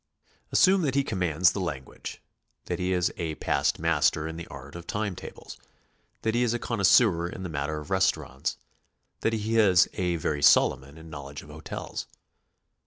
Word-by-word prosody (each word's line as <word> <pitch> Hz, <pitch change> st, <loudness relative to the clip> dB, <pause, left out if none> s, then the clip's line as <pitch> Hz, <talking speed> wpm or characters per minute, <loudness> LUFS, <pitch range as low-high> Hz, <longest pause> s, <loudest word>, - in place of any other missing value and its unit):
Assume 190 Hz, 0 st, +5 dB
that 140 Hz, -5 st, 0 dB
he 140 Hz, -, +3 dB
commands 90 Hz, -, +2 dB
the 100 Hz, -, -4 dB
lan 75 Hz, -8 st, -3 dB
guage, -, -, -9 dB, 0.4 s
that -, -, -3 dB
he 90 Hz, 0 st, 0 dB
is 90 Hz, -1 st, +1 dB
a 80 Hz, -2 st, -3 dB
past -, -, 0 dB
master 80 Hz, +1 st, +2 dB
in 80 Hz, -, -6 dB
the 85 Hz, 0 st, -7 dB
art -, -, -10 dB
of 85 Hz, 0 st, -9 dB
time 105 Hz, -3 st, -2 dB
tables, -, -, -10 dB, 0.7 s
that 110 Hz, -, +1 dB
he 120 Hz, -, +2 dB
is 120 Hz, -1 st, +2 dB
a -, -, +1 dB
connoisseur 100 Hz, -6 st, +3 dB
in 95 Hz, -, -7 dB
the 90 Hz, -, -4 dB
matter 75 Hz, 0 st, -2 dB
of 75 Hz, +4 st, -10 dB
restaurants, 95 Hz, 0 st, 0 dB, 0.6 s
that 115 Hz, -, 0 dB
he 110 Hz, +1 st, 0 dB
is 95 Hz, -4 st, +6 dB
a 90 Hz, -2 st, 0 dB
very 75 Hz, -3 st, -2 dB
Solom'on 70 Hz, +1 st, +4 dB
in 80 Hz, 0 st, -12 dB
knowledge 70 Hz, 0 st, -8 dB
of -, -, -15 dB
hotels. 75 Hz, 0 st, -6 dB
90 Hz, 180 wpm, -27 LUFS, 80-105 Hz, 0.7 s, is